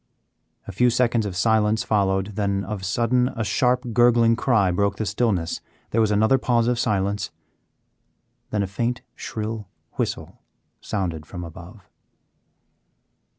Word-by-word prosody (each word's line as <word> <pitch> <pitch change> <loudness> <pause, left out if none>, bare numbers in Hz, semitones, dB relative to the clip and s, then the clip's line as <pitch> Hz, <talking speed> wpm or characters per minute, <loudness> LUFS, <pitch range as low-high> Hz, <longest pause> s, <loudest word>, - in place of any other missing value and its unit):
A - - -5
few 125 +6 +3
seconds 120 -2 +1
of 95 - -6
silence 110 +1 +2
followed, 95 -1 0
then 100 -2 0
of 100 -1 -5
sudden 120 +6 +1
a 110 - -1
sharp 125 +4 +1
gurgling 120 -1 +5
cry 110 -6 +2
broke 100 +3 +1
the 110 - -2
stillness. 95 -5 0 0.3
There 115 - +2
was 110 - +3
another 110 +5 +3
pause 120 -2 +2
of 120 -1 +1
silence, 100 -2 0 1.2
then 105 -2 0
a - - -2
faint 120 +5 -2
shrill 110 -1 -5 0.3
whistle - - -3 0.4
sounded 85 -7 -3
from 90 -2 -7
above. 90 +4 -11
105 Hz, 135 wpm, -23 LUFS, 100-115 Hz, 1.2 s, gurgling